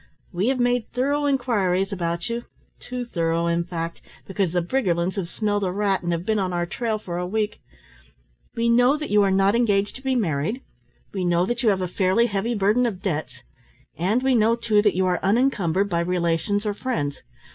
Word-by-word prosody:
"We 185 +5 0
have 260 0 +1
made 245 -2 +1
thorough 285 +4 0
inquiries 200 -9 +1
about 170 -2 -2
you, 235 +1 -4 0.3
too 250 0 -5
thorough 165 -5 0
in 170 0 +1
fact, 170 -1 -5 0.2
because 195 -3 -1
the 180 - +1
Briggerlands 180 -5 0
have 185 -4 -3
smelt 205 0 -1
a 185 - 0
rat, 195 0 0
and 175 -1 -2
have 170 +1 -2
been 215 0 +1
on 185 -2 -1
our 175 0 0
trail 220 +5 -2
for 175 -4 -5
a 180 - -2
week. 210 +2 -2 0.9
We 230 0 0
know 245 +4 +4
that 305 0 -5
you 210 0 +5
are 200 - +3
not 195 +1 +3
engaged 205 -4 +1
to - - -14
be 265 -1 0
married, 195 - -1 0.5
we 190 -2 -2
know 175 0 +2
that 240 +4 -2
you 235 - +3
have 195 -2 +1
a 185 - -1
fairly 190 +5 +2
heavy 225 +2 -1
burden 210 +5 +2
of 190 -4 -5
debts, 155 -6 -3 0.5
and 210 +9 0
we 265 0 +3
know, 230 -1 +4
too, 225 -3 +2
that 205 -3 +2
you 190 0 +2
are 180 -1 +1
unencumbered 200 -4 +2
by 170 -4 -1
relations 175 +4 0
or 210 - 0
friends. 150 - -3
200 Hz, 205 wpm, -23 LUFS, 175-235 Hz, 0.9 s, you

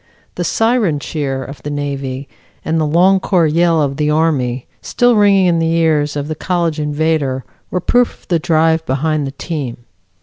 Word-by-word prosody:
The - - -3
"Siren 225 -8 +1
Cheer" 140 -3 -3
of 140 +2 -10
the 150 - -5
Navy 140 -2 -4 0.4
and 160 0 0
the 155 - +1
"Long 180 +5 +4
Corps 180 -3 +2
Yell" 165 0 +2
of 140 -1 -2
the 150 -1 0
Army 140 -6 0 0.2
still 245 -1 +2
ringing 200 -2 +4
in 170 -2 +2
the 165 0 +1
ears 155 -3 +1
of 145 0 -3
the 155 - -3
college 170 -1 -1
invader 150 -3 -1 0.2
were 180 - -1
proof 245 +6 +1
of - - -26
the 170 -2 +1
drive 160 -1 +2
behind 150 +2 0
the - - -5
team. 135 -5 -5
155 Hz, 180 wpm, -16 LUFS, 145-170 Hz, 0.4 s, Long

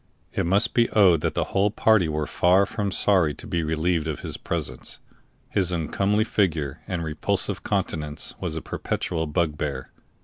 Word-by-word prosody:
It - - 0
must 100 +5 +2
be 120 -1 +3
owned 90 -7 +5
that - - -1
the - - +1
whole 100 +1 +3
party 110 -5 +3
were 75 0 -1
far 90 +5 +3
from 100 -1 -3
sorry 90 -6 +2
to - - -10
be 85 - -1
relieved 80 +1 0
of 80 - -3
his - - -4
presence; - - -4 0.5
his 95 -3 +1
uncomely 100 +5 +1
figure 80 -10 0
and 90 -3 -2
repulsive 95 +5 -1
countenance 80 -7 -2
was 80 - -3
a 80 - -4
perpetual 80 0 -2
bugbear. 75 -4 -2
85 Hz, 165 wpm, -25 LUFS, 75-100 Hz, 0.5 s, owned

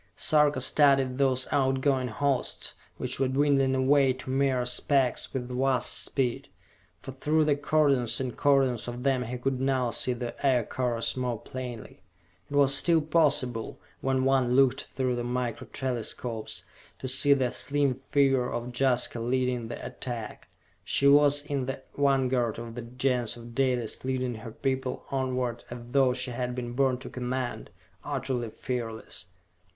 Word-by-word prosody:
Sarka 150 -1 +3
studied 135 -3 +3
those 130 -2 +2
outgoing 135 -1 +1
hosts, 135 +3 -1 0.2
which 130 +1 -1
were 135 - +2
dwindling 135 0 +2
away 135 0 +4
to 130 0 -7
mere 135 -2 +1
specks 125 +1 +1
with 125 -2 -4
vast 130 0 0
speed, 125 -4 -1 0.5
for - - -9
through 150 +4 +1
the 150 -1 +3
cordons 145 -4 +2
and 130 -2 -3
cordons 135 -5 +2
of 120 +1 -6
them 135 -2 +2
he 125 +1 -4
could 130 +1 -2
now 130 -3 +1
see 125 - +1
the 120 -1 -5
Aircars 125 -2 0
more 125 -2 -2
plainly. 125 -4 -8 0.5
It 145 - -5
was 140 -1 +5
still 165 +4 +4
possible, 145 -7 0 0.2
when 130 -1 0
one 130 -2 +2
looked 135 -1 +3
through 130 -2 0
the 120 - -3
Micro 120 -1 -3
Telescopes, 120 -3 -3 0.3
to 130 - -5
see 135 +2 +4
the 130 -3 0
slim 145 -2 +1
figure 135 -1 +1
of 120 +1 -4
Jaska 125 -2 +2
leading 125 0 -1
the 120 - -7
attack. 120 -4 -6 0.4
She 140 - +2
was 145 0 +5
in 140 -3 -3
the 135 0 -5
vanguard 130 -4 +1
of 115 0 -7
the 120 - -6
Gens 125 0 -1
of 120 0 -11
Dalis 125 -3 0
leading 130 -1 -1
her 115 0 -8
people 130 +1 -3
onward 130 -3 -2
as 120 - -6
though 130 -2 +3
she 125 0 -2
had 125 0 -3
been 120 -1 -5
born 130 0 +2
to 130 - -9
command 125 0 -4 0.3
utterly 125 -3 -3
fearless. 115 -6 -5
130 Hz, 155 wpm, -28 LUFS, 125-135 Hz, 0.5 s, was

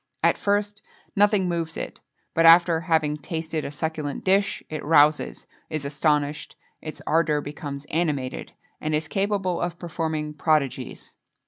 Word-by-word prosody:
At - - +5
first, 205 +1 -1 0.3
nothing 205 -2 +3
moves 165 -2 -2
it - - -6 0.3
but 165 - +3
after 165 0 +7
having 160 -3 +1
tasted 160 0 -4
a - - -4
succulent 150 -1 -3
dish, 195 +1 +1
it 155 - -5
rouses, 150 -1 +3 0.2
is 155 -3 -3
astonished, 145 0 0 0.3
its 155 - -8
ardour 155 -1 +2
becomes 145 -1 -6
animated, 150 -6 -2 0.3
and 155 0 0
is 150 0 -1
capable 195 -2 -1
of 175 -1 -2
performing 160 -3 -3
prodigies. 150 -3 -1
160 Hz, 135 wpm, -25 LUFS, 150-175 Hz, 0.3 s, after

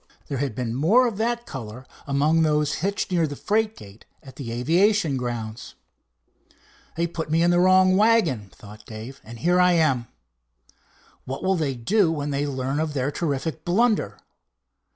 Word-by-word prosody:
There 140 - -3
had 135 -5 -2
been 120 -2 -3
more 185 - +4
of 230 -5 -2
that 235 +2 -1
color 125 0 -8 0.2
among 150 +4 +2
those 150 -1 +1
hitched 200 +1 -2
near 170 -3 +2
the 145 - -6
freight 215 +6 0
gate 100 +1 -13 0.2
at 135 - -13
the 125 -5 -6
aviation 165 - +2
grounds. 120 -2 -5 1.2
"They 170 +1 0
put 165 -2 -5
me 165 +2 +2
in 175 - +4
the 175 - +3
wrong 185 0 +5
wagon," 190 - +2
thought 105 +2 -14
Dave, 115 +5 -9
"and 115 +1 -10
here 175 +9 +2
I 180 0 +5
am. 135 -8 +2 1.2
What 135 +6 -6
will 190 +1 +2
they 150 -6 -1
do 175 - +2
when 145 -2 -3
they 140 +1 -1
learn 135 +1 -2
of 155 -2 -2
their 135 +1 0
terrific 155 0 -3
blunder?" 195 - +1
150 Hz, 170 wpm, -24 LUFS, 130-180 Hz, 1.2 s, wrong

